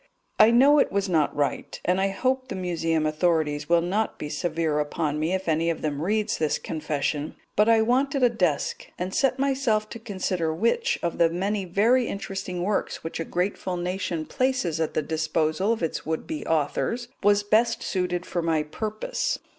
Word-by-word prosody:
I 215 - +8
know 275 +5 +6
it - - +2
was 200 0 0
not 160 -5 +1
right, 145 -1 -2
and 185 +2 +2
hope 255 +7 0
the - - -5
Museum 165 -3 0
authorities 155 -2 0
will 170 0 +4
not 205 +5 -1
be 150 - -5
severe 155 0 -1
upon 150 0 -1
me 160 +3 0
if 190 -1 -2
any 165 +1 +2
of 165 - -3
them 145 -2 -2
reads 210 +5 0
this 155 -2 +1
confession; 150 -1 -3 0.2
but 210 +2 +4
I 225 -1 +5
wanted 265 +3 +1
a 245 - +6
desk, 180 -11 -1
and 185 +1 -4
set 265 -1 +2
myself 265 -6 +1
to 230 - -8
consider 185 -6 -2
which 235 - +1
of 170 0 -2
the 170 -1 +5
many 195 +4 -1
very 225 +8 +3
interesting 195 -3 -4
works 205 +2 -1
which 165 - -5
a - - -1
grateful 180 +1 -2
nation 175 -2 -2
places 255 - 0
at 160 - -1
the 155 - +1
disposal 155 +5 0
of 225 -6 -1
its 165 - -2
would 160 +1 -3
be 310 -1 -5
authors 165 - 0
was 205 0 +4
best 225 +3 +2
suited 180 -2 -1
for 175 - -2
my 160 -2 +1
purpose. 215 - -3
180 Hz, 185 wpm, -25 LUFS, 160-220 Hz, 0.2 s, I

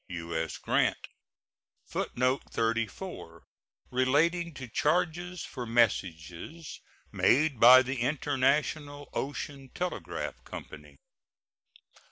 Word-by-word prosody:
U.S. 85 -2 -3
GRANT. - - 0 0.8
[Footnote 125 +2 0
34: 115 - -3 0.5
Relating 155 +7 +2
to 130 -1 -7
charges 175 +6 0
for 125 -3 -6
messages 100 - -1 0.3
made 140 -1 +3
by 130 +3 +9
the 130 +1 -3
International 145 +2 0
Ocean 140 -1 -4
Telegraph 180 -2 -4
Company. - - -10
130 Hz, 80 wpm, -29 LUFS, 115-155 Hz, 0.8 s, by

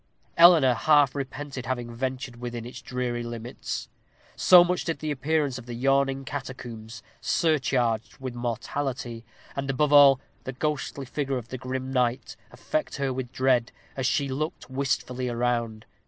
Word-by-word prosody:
Eleanor 165 -7 +7
half 145 +1 +4
repented 140 -1 -5
having 120 -2 -3
ventured 130 0 -4
within 120 -1 -5
its 120 - -9
dreary 125 -2 -3
limits, 120 0 -5 0.5
so 180 -1 +8
much 180 +1 -1
did 165 - -2
the 155 -1 -3
appearance 145 -1 0
of 120 - -13
the 120 - -5
yawning 135 +1 +1
catacombs, 120 -5 -7 0.2
surcharged 130 -8 +1
with 130 -2 -6
mortality, 120 0 -3 0.3
and, 140 0 -3
above 145 +2 +1
all, 140 -2 +8 0.2
the 130 - -5
ghostly 140 0 -3
figure 135 0 -2
of 120 -1 -7
the 130 - -5
grim 130 +1 -4
knight, 125 -1 0 0.2
affect 310 -1 -3
her 135 -2 -1
with 125 -1 -5
dread, 130 -2 +2 0.2
as 130 -2 0
she 140 0 +1
looked 140 +1 -4
wistfully 130 -2 -1
around. 120 -2 -1
130 Hz, 150 wpm, -26 LUFS, 120-140 Hz, 0.5 s, so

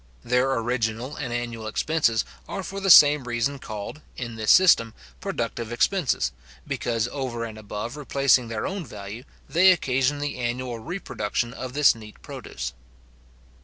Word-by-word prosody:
Their 125 +2 +2
original 115 +2 -2
and 130 -5 -4
annual 120 -2 -4
expenses 115 -1 +1 0.2
are 195 - -4
for 195 +2 -5
the 195 0 -1
same 145 -4 +8
reason 120 +3 -1
called, 110 +8 -7 0.2
In 120 -3 -5
this 110 -1 -2
system, 115 -12 +6 0.2
productive 115 - -3
expenses, 150 - +1 0.3
because, 115 -1 -1
over 125 -4 -3
and 110 -2 -8
above 110 +3 -6
replacing 140 -4 +2
their 110 -1 -3
own 195 -1 -3
value, 105 -1 -8 0.2
they 185 +3 +6
occasion 135 -4 +1
the 145 -2 -4
annual 120 0 -3
reproduction 120 - -3
of 130 -2 -6
this 145 0 +5
neat 110 -2 -13
produce. - - -6
125 Hz, 145 wpm, -25 LUFS, 115-145 Hz, 0.3 s, same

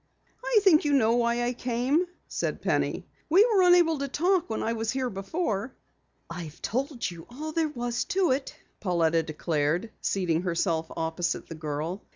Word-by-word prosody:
"I - - +4
think 340 -6 +6
you 295 -1 +1
know 230 -4 +4
why 235 0 +1
I 245 +1 0
came," 255 +8 0 0.2
said - - -3
Penny. - - 0 0.2
"We 380 +7 +6
were 435 -6 +3
unable 350 -4 +5
to 280 - -2
talk 350 +5 +1
when 220 - -2
I 230 - 0
was 225 -1 -3
here 260 0 -1
before." 210 - -3 0.5
"I've 170 -1 -8
told 260 - -2
you 170 -1 -11
all 300 +6 -6
there 320 0 0
was 240 -4 -2
to 370 -5 +1
it," 265 +1 -2 0.2
Pauletta 170 -4 +2
declared, 160 +5 -1
seating 175 -4 0
herself 170 -2 0
opposite 165 +2 -2
the - - -5
girl. 155 +4 -4
235 Hz, 170 wpm, -27 LUFS, -, 0.5 s, think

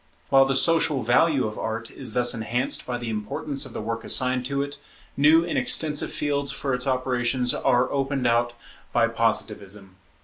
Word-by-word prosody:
While 135 0 +6
the 135 0 0
social 155 -2 +3
value 130 +4 +3
of 105 0 -5
Art 115 +1 -4
is 125 -5 -4
thus 125 -1 +3
enhanced 120 +3 -1
by 125 -1 -2
the 120 -2 -5
importance 135 +7 -3
of 125 - -12
the - - -5
work 115 +1 -4
assigned 125 -1 0
to 140 +1 -1
it, 145 0 -8 0.4
new 155 +4 +5
and 175 - 0
extensive 160 - 0
fields 140 -1 -1
for 135 -1 -3
its 125 +1 -2
operations 125 -1 0
are 125 +1 +2
opened 135 -1 -1
out 120 0 +2 0.4
by - - +3
Positivism. 95 -1 -2
130 Hz, 175 wpm, -24 LUFS, 120-140 Hz, 0.4 s, While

